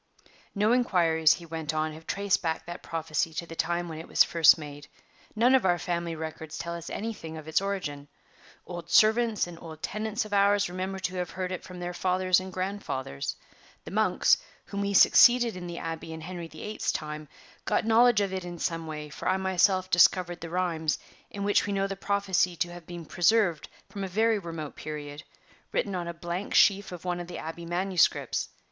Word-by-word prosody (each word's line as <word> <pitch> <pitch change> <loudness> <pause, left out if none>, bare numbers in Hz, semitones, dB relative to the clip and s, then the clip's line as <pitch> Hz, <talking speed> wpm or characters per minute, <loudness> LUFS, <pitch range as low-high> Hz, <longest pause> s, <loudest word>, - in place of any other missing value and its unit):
"No 210 +2 +3
inquiries," 165 -10 +3
he 170 - -11
went 160 -1 -4
on, 155 0 -1
"have 160 +1 -13
traced 200 -1 +1
back 160 -2 -2
that 175 0 -7
prophecy 160 0 -2
to 170 - -3
the 165 - -9
time 175 +2 -1
when 160 -1 -7
it 165 - -9
was - - +5
first 165 -1 +6
made; 145 -2 -9 0.5
none 240 +4 +4
of 265 - +5
our 175 -2 +3
family 170 -1 -3
records 160 -1 -6
tell 170 - -4
us 170 -1 -7
anything 200 -8 -5
of 155 -1 -10
its 160 - +2
origin. 170 -8 -4 0.6
Old 175 -1 -8
servants 220 +3 +4
and 175 -1 -10
old 160 -2 -10
tenants 215 +2 -2
of 210 - -8
ours 200 -1 +3
remember 185 +1 -3
to 185 -1 -3
have 180 -1 -2
heard 185 0 -4
it 185 - -4
from 180 +1 -10
their 175 0 -4
fathers 185 0 +2
and 185 0 -7
grandfathers. 185 - -4 0.5
The - - -8
monks, - - +3 0.3
whom 200 - -4
we 200 0 -1
succeeded 240 +2 +6
in 180 -1 -6
the 170 0 -6
Abbey 165 -1 -5
in 160 - -8
Henry 175 0 -6
the 155 -1 -11
Eighth's 210 +1 -2
time, 150 0 -5 0.4
got - - +1
knowledge 225 -1 +5
of 195 -1 -1
it 190 -1 -3
in 175 -1 -7
some 165 0 -2
way, 150 -1 -6
for 150 - -6
I 190 - +2
myself 190 0 +2
discovered 175 0 +4
the 165 - -6
rhymes, 165 -3 0 0.3
in 200 - -5
which 205 0 +2
we 200 - -1
know 195 0 +1
the 195 0 -3
prophecy 195 -3 +1
to 175 +1 -2
have 175 -2 -11
been 175 -2 -7
preserved 175 -1 +2 0.2
from 200 - -6
a - - -2
very 220 +3 +2
remote 165 -5 -6
period, 150 -1 -7 0.5
written 200 - -1
on 175 -2 -3
a 170 - -4
blank 175 +3 -2
leaf 200 0 -9
of 180 0 -9
one 175 -1 -1
of 175 - -6
the 175 - -7
Abbey 165 +1 -7
manuscripts. 180 +1 +1
175 Hz, 205 wpm, -28 LUFS, 165-195 Hz, 0.6 s, first